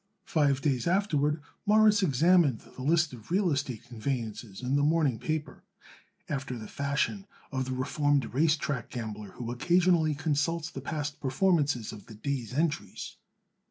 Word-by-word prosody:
Five 140 -3 +2
days 135 -4 0
afterward 155 -5 +1 0.2
Morris 210 0 +5
examined 165 - +4
the - - -8
list 155 +1 +2
of 115 -2 -12
real 185 0 +2
estate 130 -5 -2
conveyances 115 -3 -4
in 130 +2 0
the 145 - +3
morning 150 -5 +2
paper, 155 -1 -3 0.7
after 135 -3 -3
the 110 -2 -8
fashion 140 +8 -1 0.2
of 130 -2 -1
the 130 - -3
reformed 145 +2 +1
race 155 +3 +3
track 140 -5 -3
gambler 110 -4 -6
who 120 -1 -5
occasionally 170 +3 +3
consults 160 +3 -1
the - - -6
past 150 -2 -4
performances 145 - +1
of 105 -2 -11
the 110 - -11
day's 120 0 -3
entries. 150 +3 -2
145 Hz, 150 wpm, -29 LUFS, 125-160 Hz, 0.7 s, Morris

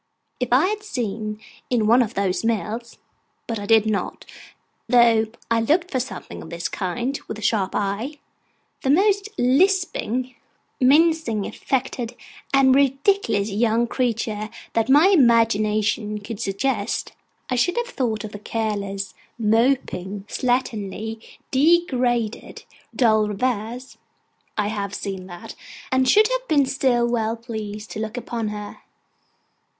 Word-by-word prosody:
If 250 - -1
I 260 +7 +5
had 420 +2 -1
seen 215 - -4 0.3
in 235 -4 +2
one 235 +4 +5
of 225 - -2
those 195 0 0
mills 230 +1 -2 0.5
(but 230 -2 -3
I 205 - -6
did 225 -1 +5
not, 205 -4 -2 0.6
though 230 -2 +5 0.2
I 230 0 +3
looked 335 +9 +1
for 260 - 0
something 255 +1 -6
of - - -10
this 170 +1 -3
kind 240 +8 -3
with 215 - -5
a - - -9
sharp 200 -3 +1
eye), 210 +9 -2 0.6
the 265 - -1
most 400 +6 +3
lisping, 255 - +1 0.5
mincing, 285 -5 +3
affected, 255 -3 -3 0.4
and 270 -1 +5
ridiculous 275 - +2
young 225 +3 +2
creature 225 -3 -2 0.2
that 225 +2 +1
my 295 +8 +7
imagination 215 - +3
could 205 +1 -7
suggest, 205 +2 -1 0.4
I - - +2
should 350 - +1
have 480 0 -1
thought 230 -4 -1
of 215 - -6
the 205 - -8
careless, 200 -3 -3 0.2
moping, 215 -4 0
slatternly, 220 -4 -2 0.3
degraded, 255 -7 +1 0.3
dull 220 -4 +3
reverse 235 +3 -3 0.6
(I 210 -1 +1
have 205 -2 -3
seen 190 -2 -5
that), 175 -1 -9 0.4
and 260 0 +3
should 430 +1 +6
have - - -2
been 285 -3 +4
still 260 -3 +1
well 225 -2 0
pleased 215 -2 -7
to - - -5
look 220 +2 -4
upon 235 -2 -3
her. 210 -1 -6
230 Hz, 135 wpm, -23 LUFS, 210-265 Hz, 0.6 s, my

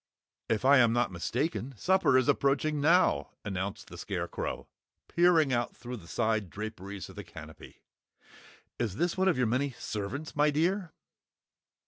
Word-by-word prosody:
"If 115 +1 0
I 140 0 +7
am 115 -2 +5
not 120 -3 +1
mistaken, 125 - -2
supper 185 - +3
is 130 - +2
approaching 145 +2 +1
now!" 170 +5 +3 0.2
announced 95 0 -4
the - - -10
Scarecrow, - - -4 0.4
peering 170 -5 +4
out 120 -1 -1
through 125 0 -7
the 85 -6 -13
side 110 -2 0
draperies 100 -1 -7
of - - -13
the - - -7
Canopy. 80 -1 -12 1.0
"Is 110 -6 -1
this 175 +8 0
one 190 0 +1
of 180 - +3
your 125 - +2
many 130 +4 0
servants, 110 +9 -5
my 150 0 +4
dear?" 170 +4 0
130 Hz, 150 wpm, -30 LUFS, 105-155 Hz, 1.0 s, I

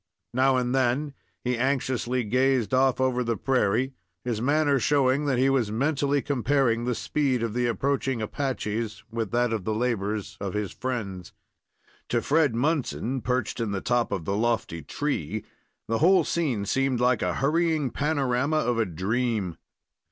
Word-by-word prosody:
Now 130 +1 +3
and 125 0 0
then 135 +3 +1 0.3
he 125 -1 -1
anxiously 130 -1 0
gazed 130 +1 +1
off 130 0 +3
over 130 -1 +1
the 115 -2 -1
prairie, 130 0 +1 0.3
his 115 -3 -2
manner 145 +1 +2
showing 140 +2 +2
that 135 -3 +1
he 130 +2 +3
was 130 -6 +1
mentally 140 +3 +1
comparing 130 -3 +1
the 125 -1 0
speed 130 -4 0
of 115 -2 -2
the 120 0 +1
approaching 135 +1 0
Apaches 110 -3 -3
with 115 -2 -2
that 120 0 +1
of 110 -4 -2
the 110 +3 -1
labors 110 -4 -2
of 100 0 -3
his 105 -2 -2
friends. 100 -9 -4 0.8
To 120 - +2
Fred 145 -1 +2
Munson, 135 -2 -1
perched 125 0 -1
in 110 -3 -1
the 95 - -1
top 120 +3 0
of 85 -5 -3
the 100 - -1
lofty 110 -7 -1
tree, 110 - -3 0.4
the 115 0 0
whole 185 +5 +5
scene 135 -12 -1
seemed 135 +2 +1
like 125 -1 +2
a 90 -1 0
hurrying 155 -1 +1
panorama 140 -1 0
of 120 -6 +1
a 115 - +3
dream. 100 +1 -1
125 Hz, 160 wpm, -26 LUFS, 110-135 Hz, 0.8 s, whole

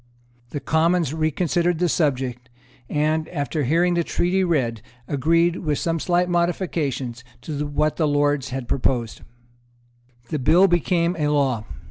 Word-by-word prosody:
The 145 - -4
Commons 160 0 +1
reconsidered 170 +2 0
the 175 +2 +1
subject, 130 -6 -1 0.4
and, 155 +1 0
after 145 -2 -2
hearing 170 +6 +2
the 170 0 +1
Treaty 180 +3 0
read, 130 -11 0 0.3
agreed, 165 +5 +2
with 150 -4 -1
some 165 -1 -1
slight 175 +2 +1
modifications, 165 -8 -1 0.2
to 150 -1 -4
what 150 +1 0
the 155 - +2
Lords 145 -2 +1
had 130 -2 -5
proposed. 120 -4 -1 1.1
The 155 - -2
bill 175 +9 +5
became 175 0 +1
a 150 - +1
law. 135 -7 +1
155 Hz, 135 wpm, -22 LUFS, 140-170 Hz, 1.1 s, bill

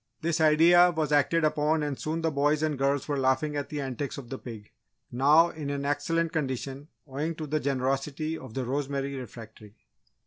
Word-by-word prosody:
This 165 0 0
idea 165 +3 +6
was 160 -3 -2
acted 150 +3 +3
upon 155 0 +1
and 145 -2 -2
soon 160 +2 -3
the 160 - +1
boys 145 +1 +1
and 155 -1 0
girls 140 +1 0
were 145 -2 -1
laughing 130 +3 +1
at 145 -1 -3
the 150 - -4
antics 135 0 -4
of 130 -4 -9
the 135 - -6
pig, 110 -4 -10 0.4
now 150 +7 +5
in 150 -3 -6
an 140 0 -3
excellent 165 +3 0
condition 135 -1 -3 0.2
owing 150 +4 -3
to 155 - -5
the 155 +1 -1
generosity 135 +3 -1
of 130 -7 -10
the 130 -2 -2
Rosemary 140 +1 -2
refectory. 110 -4 -10
145 Hz, 185 wpm, -27 LUFS, 135-155 Hz, 0.4 s, idea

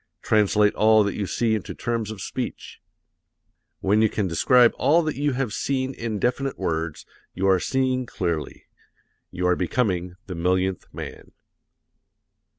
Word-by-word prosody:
Translate 105 -1 +3
all 110 0 +5
that 100 - -1
you 100 - -3
see 115 +2 0
into 110 -4 -3
terms 115 -2 -2
of 110 -3 -7
speech. - - -6 1.0
When 105 +3 +3
you 110 - +4
can 100 -2 -1
describe 120 +8 +4
all 165 +4 +4
that 155 -1 -2
you 145 0 0
have 125 -4 -2
seen 130 +1 -1
in 115 -4 -4
definite 130 +5 -1
words, 80 -1 -3 0.3
you 95 +2 0
are 95 -1 +4
seeing 130 +2 0
clearly. 85 -8 -3 0.7
You 90 0 -3
are 90 0 +3
becoming 90 -2 -1
the 95 - -6
millionth 90 +2 0
man. - - -9
105 Hz, 150 wpm, -24 LUFS, 90-125 Hz, 1.0 s, all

